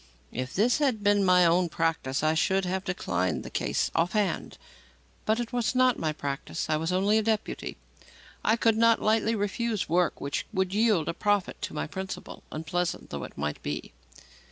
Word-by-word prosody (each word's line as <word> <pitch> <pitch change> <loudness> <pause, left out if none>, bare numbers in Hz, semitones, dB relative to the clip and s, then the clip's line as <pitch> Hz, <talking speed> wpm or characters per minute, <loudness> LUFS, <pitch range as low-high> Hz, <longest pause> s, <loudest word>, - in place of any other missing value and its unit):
If 130 +1 -4
this 235 +8 +3
had 255 -8 +1
been 205 0 +4
my 180 -1 +5
own 170 +1 +3
practice, 160 -5 -1
I 155 0 +3
should 190 +4 +2
have 190 +1 -2
declined 95 - -1
the - - -9
case - - 0
off 170 +3 +1
hand. 205 -6 -1 0.7
But 220 +2 +2
it 240 -1 -4
was 240 0 0
not 255 -1 +4
my 155 - 0
practice. 140 - -4
I 155 - +3
was 165 +3 -2
only 200 +4 +3
a - - +1
deputy. 220 -1 -2 0.7
I 220 - +4
could 225 -1 +2
not 230 0 +5
lightly 220 +1 +2
refuse 210 +1 -1
work 175 +2 +1
which 140 0 -3
would 190 0 0
yield 210 -7 +3
a - - -1
profit 205 0 0
to - - -4
my - - -1
principal, 190 +4 -6
unpleasant 170 +3 -3
though - - -4
it - - -13
might 75 +1 -3
be. 75 +1 -5
190 Hz, 185 wpm, -28 LUFS, 160-220 Hz, 0.7 s, my